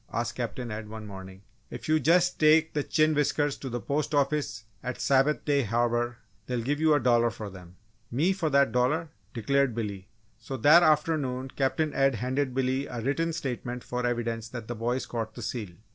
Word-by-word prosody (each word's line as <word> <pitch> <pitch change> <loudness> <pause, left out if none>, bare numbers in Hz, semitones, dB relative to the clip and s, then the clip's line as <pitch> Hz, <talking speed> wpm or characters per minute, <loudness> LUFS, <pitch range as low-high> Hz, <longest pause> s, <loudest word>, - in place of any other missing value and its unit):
asked - - -2
Captain 125 -3 -4
Ed, 105 0 -6
one 110 0 -8
morning. 95 -1 -10 0.3
"If - - -8
you 155 0 +3
just 175 +5 +3
take 155 +1 +5
the 150 - 0
chin 155 +2 +2
whiskers 145 -1 +1
to 135 - -6
the 120 0 -3
Post 145 +4 -1
Office 145 -5 0 0.2
at 125 0 -5
Sabbath 140 +2 +2
Day 145 -2 +3
Harbour 120 +1 0 0.3
they'll 125 -2 -2
give 145 +4 -1
you 155 -1 +4
a - - +3
dollar 120 -2 +3
for 105 -2 -7
them." 90 -1 -13 0.3
"Me 155 +11 +2
for 170 -5 -1
that 140 -4 +3
dollar!" 150 +7 +1 0.3
declared 135 +2 +1
Billy. 100 -4 -4 0.3
So 130 +3 -6
that 150 +8 +7
afternoon 150 -5 +1
Captain 145 +2 0
Ed 135 -2 +2
handed 130 +3 -1
Billy 130 +1 0
a 120 - -5
written 155 +7 0
statement 125 -5 -4
for 125 0 -3
evidence 115 -2 -2
that 120 -3 -7
the 120 - -3
boy 120 +3 -1
caught 110 -2 -5
the 120 - -7
seal. 105 -6 -5
130 Hz, 190 wpm, -28 LUFS, 115-145 Hz, 0.3 s, that